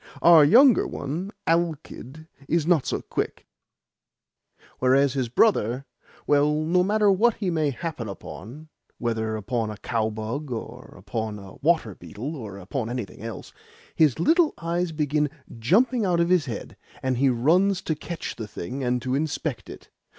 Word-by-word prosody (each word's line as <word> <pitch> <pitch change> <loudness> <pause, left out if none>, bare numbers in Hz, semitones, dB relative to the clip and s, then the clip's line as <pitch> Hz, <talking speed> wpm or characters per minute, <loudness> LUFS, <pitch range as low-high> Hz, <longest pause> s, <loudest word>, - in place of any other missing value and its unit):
Our 165 -2 +8
younger 245 - +6
one, 165 +8 -4
Alkid, 160 -3 -2 0.2
is 170 -2 +2
not 165 -6 +2
so - - -1
quick; - - -4 1.3
whereas 130 +1 +3
his 130 -4 -1
brother 130 - +2 0.4
well, 145 +1 +3
no 180 +3 +2
matter 210 +1 +3
what 220 +4 +3
he 195 -4 -2
may 155 -3 +1
happen 140 -5 -5
upon 125 +9 -9 0.3
(whether 110 -2 -2
upon 110 +1 -2
a 105 - -6
cowbug 110 +6 -3
or 115 -3 -7
upon 110 -2 -4
a 100 -1 -11
water 160 - +1
beetle 105 - -7
or 105 -8 -8
upon 110 +5 -4
anything 120 -7 -5
else), 115 -3 -8 0.4
his 150 -6 +3
little 320 - +3
eyes 170 +1 -2
begin 150 -1 0 0.3
jumping 230 - +3
out 180 -3 +1
of 170 0 +2
his 180 -5 +3
head, 115 -4 -6 0.3
and 130 -1 0
he 135 +2 +3
runs 175 +11 +3
to 160 - -1
catch 165 +2 -6
the 110 - -5
thing, 115 +7 -6
and 125 -1 0
to 130 - -2
inspect 145 -1 -2
it. - - -12
145 Hz, 155 wpm, -25 LUFS, 115-170 Hz, 1.3 s, Our